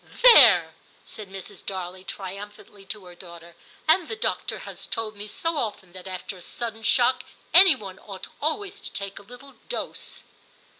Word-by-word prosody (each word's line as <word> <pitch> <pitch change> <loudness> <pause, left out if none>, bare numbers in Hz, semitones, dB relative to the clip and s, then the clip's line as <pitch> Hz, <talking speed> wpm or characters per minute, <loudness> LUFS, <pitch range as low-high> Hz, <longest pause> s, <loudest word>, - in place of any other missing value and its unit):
* - - -11
There,' 215 - +9 0.3
said 210 -3 -9
Mrs. 195 -1 -9
Darley 185 -1 -6
triumphantly 200 +1 -9
to 195 0 -6
her 180 - -11
daughter, 170 -1 -12 0.3
*and 325 +1 +4
the 445 - -4
doctor 435 - -2
has - - -8
told 220 -2 -3
me 205 +1 -7
so 330 +9 -2
often 205 -7 -4
that 185 0 -10
after 185 +1 -6
a - - -13
sudden 225 +3 -6
shock 250 +2 +3 0.3
any 370 -2 +9
one 190 -2 -10
ought 195 -3 -8 0.2
always 395 +6 -2
to - - -8
take 200 -1 -4
a - - -13
little 245 +6 -13
dose.' - - -5
205 Hz, 170 wpm, -25 LUFS, 190-260 Hz, 0.3 s, There